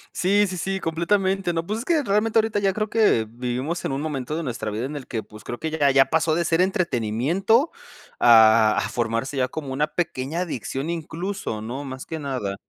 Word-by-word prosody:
Sí, 200 +3 +3
sí, 185 -1 -5
sí, 190 +3 -2
completamente, 190 +2 0
no, 165 - -1
pues, 215 +4 -3
es 240 - -6
que 325 -2 +2
realmente 215 +2 +2
ahorita 215 -1 0
ya 195 -1 +1
creo 215 0 -2
que 210 - +3
vivimos 125 +7 -3
en - - -1
un 135 +2 -2
momento 150 -2 -3
de 165 - -2
nuestra 115 -7 -4
vida 110 +4 -3
en 145 +3 -5
el 140 - -6
que, 110 -2 -3
pues, 105 +1 -14
creo 120 - -6
que 160 - -2
ya 150 -3 +2
ya 135 0 +5
pasó 160 +2 +1
de 170 0 0
ser 165 +3 +2
entretenimiento 185 - +1 0.5
a 110 -2 +6
a - - 0
formarse 120 +4 -2
ya 130 - +2
como 145 -3 -6
una 145 +3 +1
pequeña 160 -1 -2
adicción 140 -2 -4
incluso, 170 - -4
¿no?, 125 +6 -5
más 130 -1 -7
que 160 - -4
nada, 130 -9 -3
155 Hz, 215 wpm, -23 LUFS, 125-190 Hz, 0.5 s, a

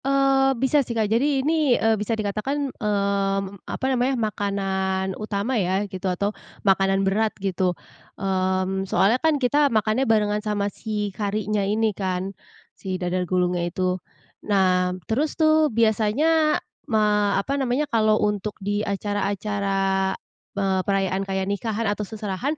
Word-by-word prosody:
Eee, 270 -1 +3
bisa 265 +4 +3
sih 235 -3 -4
Kak, 220 - +2
jadi 270 +3 +2
ini, 305 -5 +3
eee, 225 0 +3
bisa 215 +1 -1
dikatakan, 250 +7 -2
mmm, 200 -2 -1
apa - - -3
namanya, 260 0 +1
makanan 195 -3 -1
utama 210 +4 -3
ya 190 +3 0
gitu, 190 -1 -4
atau 200 +3 -1 0.3
makanan 195 0 +3
berat 215 +3 +2
gitu, 185 -2 -1 0.4
mmm, 190 0 -1
soalnya 225 +6 +3
kan 320 -2 +3
kita 285 +2 +3
makannya 220 +2 +1
barengan 210 -1 +2
sama 205 -1 -2
si 210 -3 -3
karinya 210 +1 -1
ini 215 +2 +1
kan, 190 0 -3 0.4
si 190 -2 -4
dadar 180 0 -2
gulungnya 180 -1 +1
itu. 185 0 -1 0.5
Nah 185 -2 +2
terus 280 - -1
tuh 310 -1 +4
biasanya 230 +8 +2 0.3
ma 210 -3 +2
apa 200 +8 -1
namanya, 260 +3 +1
kalau 215 -5 +2
untuk 210 0 -2
di 205 +1 -2
acara-acara, 200 -1 -1 0.4
eee, 190 -1 +1
perayaan 195 0 0
kayak 190 0 -1
nikahan 215 +3 -2
atau 205 0 -1
seserahan, 220 +7 -3
205 Hz, 140 wpm, -24 LUFS, 195-230 Hz, 0.5 s, tuh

